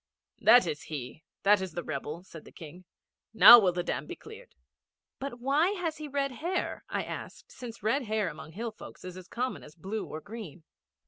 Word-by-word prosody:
'That 245 - +7
is 145 - -3
he. 150 0 -7 0.2
That 205 0 +5
is 190 -3 -5
the 175 - -4
rebel,' 155 +3 -5
said 165 -4 -12
the - - -14
King. 175 +3 -12 0.5
'Now 240 +2 +11
will 190 -4 +3
the 175 0 -2
dam - - -3
be - - -6
cleared.' 455 +3 -13 0.6
'But 270 -3 -5
why 290 +9 +2
has 330 -3 -2
he 305 - -6
red 280 -1 -1
hair?' 345 +8 -3
I - - -1
asked, - - -8
since 230 -4 -9
red 250 +5 +1
hair 215 -2 0
among 155 0 -8
hill 230 +5 -4
folks 215 - -12
is 180 -1 -7
as 185 -1 -10
common 250 +2 -3
as 150 - -14
blue 195 +6 -5
or 155 - -6
green. 195 -4 -9
215 Hz, 200 wpm, -29 LUFS, 170-260 Hz, 0.6 s, Now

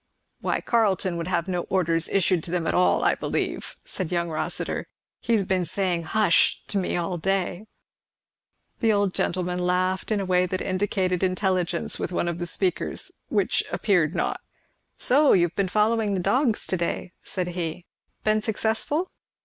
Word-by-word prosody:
"Why - - -1
Carleton 195 -6 +1
would 170 - -3
have 175 -1 0
no 180 -2 -1
orders 165 -3 +1
issued 185 -3 +2
to - - -8
them 175 -1 -1
at - - 0
all, 180 - +3
I - - +4
believe," - - -3
said 185 -3 -4
young 170 -1 0
Rossitur; 155 - -1 0.3
"he 235 - -1
has 210 -3 +3
been 185 -1 0
saying 175 0 -1
'hush' 205 0 +3
to 200 - 0
me 180 - -1
all 175 0 -2
day." 195 +2 -1 1.1
The 225 - +3
old 200 -2 +1
gentleman 180 0 -1
laughed 185 +2 0
in 210 - +2
a 195 - -2
way 180 0 +2
that 185 +1 -2
indicated 185 -1 0
intelligence 185 -2 0
with - - -3
one 175 - 0
of 170 0 -2
the 175 - -1
speakers, 180 +1 0 0.2
which, - - +1
appeared 180 -6 +2
not. - - -1 0.6
"So 285 +3 +4
you've 175 -2 +2
been 200 -1 +1
following 215 +1 +2
the - - 0
dogs 245 +4 +1
to 185 - 0
day," 170 +1 -3
said 180 -2 -3
he. 170 -1 -4 0.4
"Been 215 0 +2
successful?" 225 - -1
185 Hz, 170 wpm, -25 LUFS, 175-205 Hz, 1.1 s, I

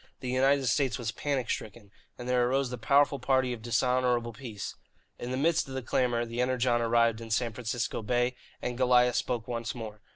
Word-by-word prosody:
The 125 -2 -4
United 135 +1 +3
States 130 0 +1
was 115 -2 -3
panic 135 -4 -2
stricken, 105 -1 -5 0.3
and 125 - -7
there 125 -1 +2
arose 135 -1 0
the 125 - -4
powerful 140 +4 +3
party 130 -2 +1
of 115 - -8
dishonourable 120 0 +1
peace. 110 -4 -6 0.5
In 120 - -5
the 130 - -2
midst 160 +2 +2
of 135 - -7
the 130 - -3
clamour 120 -1 +1
the 115 +1 -3
Energon 125 -1 +1
arrived 115 -1 +2
in 115 - -8
San 115 0 0
Francisco 115 0 -3
Bay 120 +2 0 0.3
and 125 0 -3
Goliah 125 -1 +4
spoke 120 -2 -1
once 120 -1 -3
more. 110 -3 -7
125 Hz, 195 wpm, -29 LUFS, 115-130 Hz, 0.5 s, Goliah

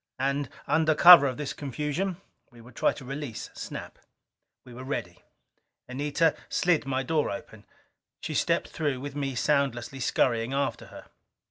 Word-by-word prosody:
And, 140 0 -1 0.2
under 155 0 +2
cover 170 -3 +9
of 130 - -3
this 145 -2 -4
confusion, 150 +7 -3 0.3
we 120 -3 -18
would 120 +1 -15
try - - +2
to 130 - -10
release 135 -3 -6
Snap. - - -8 0.7
We 125 - -12
were 125 +2 -9
ready. 90 -10 -5 0.7
Anita 145 +5 0
slid 170 -5 +1
my 135 0 -1
door 155 +2 0
open. 110 -3 -8 0.5
She - - -5
stepped - - 0
through, 145 -5 -2
with 140 +1 -7
me 135 -2 -3
soundlessly 135 -2 0
scurrying 120 -1 +1
after 140 0 -2
her. - - -12
140 Hz, 150 wpm, -27 LUFS, 125-150 Hz, 0.7 s, cover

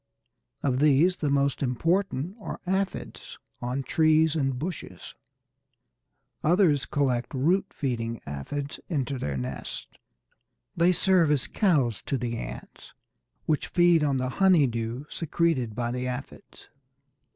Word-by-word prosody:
Of 130 -2 +1
these 150 +5 +4
the 150 - -1
most 140 -1 +1
important 165 - 0
are 205 - -6
Aphides 190 +1 -3 0.2
on 125 +3 -2
trees 155 +1 +3
and 135 -4 0
bushes; 165 +4 -6 1.3
others 160 -5 +3
collect 130 -5 0
root 180 +9 +2
feeding 115 -5 -3
Aphides 105 - -5
into 140 -5 -2
their 70 - -2
nests. 65 -1 -5 0.8
They 170 +2 +4
serve 185 -3 +3
as 145 -4 +2
cows 145 - +1
to 135 - 0
the 120 -1 -3
ants, - - -9 0.5
which 155 -2 0
feed 175 -3 +4
on 140 -2 +1
the 130 0 -1
honey 185 -6 +6
dew 115 +2 -3
secreted 155 -9 -1
by 120 0 -2
the 125 +1 -3
Aphides. 125 +2 -8
140 Hz, 125 wpm, -27 LUFS, 125-170 Hz, 1.3 s, honey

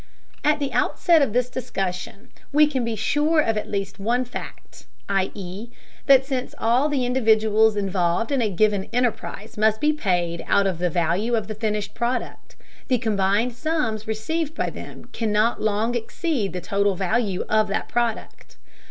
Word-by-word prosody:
At 300 +1 +3
the 280 -3 -3
outset 320 +6 +3
of 275 - +2
the 250 +3 +2
discussion, 210 -3 -5 0.2
we 300 +1 +6
can 270 -4 -1
be 230 -1 -2
sure 295 +8 +2
of 225 -7 +2
at 210 - -3
least 200 -1 -3
one 240 +5 0
fact, 245 - -9 0.2
i.e. 195 +2 -3 0.4
that 270 -1 +6
since 265 -2 -3
all 245 +6 +2
the 270 -4 0
individuals 220 -3 +3
involved 195 +2 0
in 275 -3 +2
a 220 - +1
given 205 +1 +1
enterprise 230 -3 -2
must 220 0 +3
be 300 0 +2
paid 175 - -1
out 200 - +3
of 185 -4 -1
the 180 0 +1
value 175 +8 0
of 220 - -1
the 215 - -4
finished 210 -1 -2
product, 240 +2 -3 0.3
the 255 - +3
combined 215 +1 +1
sums 245 -6 -2
received 310 +9 -2
by - - -1
them - - -10
cannot 220 +1 +1
long 215 +2 0
exceed 240 - -2
the 180 - -5
total 200 +2 +1
value 195 +1 0
of 215 0 +2
that 200 - -2
product. 235 -2 -3
220 Hz, 165 wpm, -23 LUFS, 200-250 Hz, 0.4 s, we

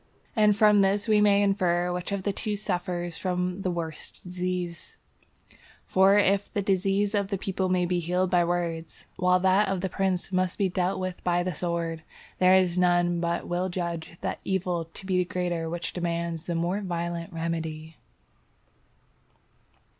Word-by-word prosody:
And 210 -2 +4
from 210 -1 +5
this 200 +2 +2
we 215 -1 +4
may 205 -1 +5
infer 180 -3 +1
which 180 +2 -4
of 200 -1 -2
the 200 - 0
two 210 +2 -1
suffers 175 -3 -2
from 180 0 -2
the 185 - -1
worse 165 -3 -4
disease; 180 -1 -5 0.9
for 190 +2 +5
if 200 0 +2
the 205 - -1
disease 195 +2 +1
of 200 -2 +1
the 195 0 -2
people 190 0 -2
may 180 -1 +2
be 175 0 0
healed 180 +2 0
by 175 -1 +4
words, 170 -2 -3
while 180 0 +3
that 190 +2 +4
of 190 -2 -1
the 190 - -1
prince 190 0 -1
must 185 -1 0
be 195 -2 +1
dealt 180 +1 -1
with 185 -1 -4
by 175 0 +1
the 180 0 -2
sword, 170 -2 -2 0.4
there 185 0 +6
is 180 -1 +3
none 175 -1 +3
but 170 0 -1
will 180 +2 -1
judge 170 -2 -4
that - - -3
evil 180 -3 -1
to 165 +4 -12
be 185 -1 +1
the - - +3
greater 175 -2 -2
which 170 +1 -4
demands 170 -1 -3
the 170 - -2
more 175 +5 0
violent 170 -2 -3
remedy. 160 -1 -4
180 Hz, 170 wpm, -27 LUFS, 170-190 Hz, 0.9 s, there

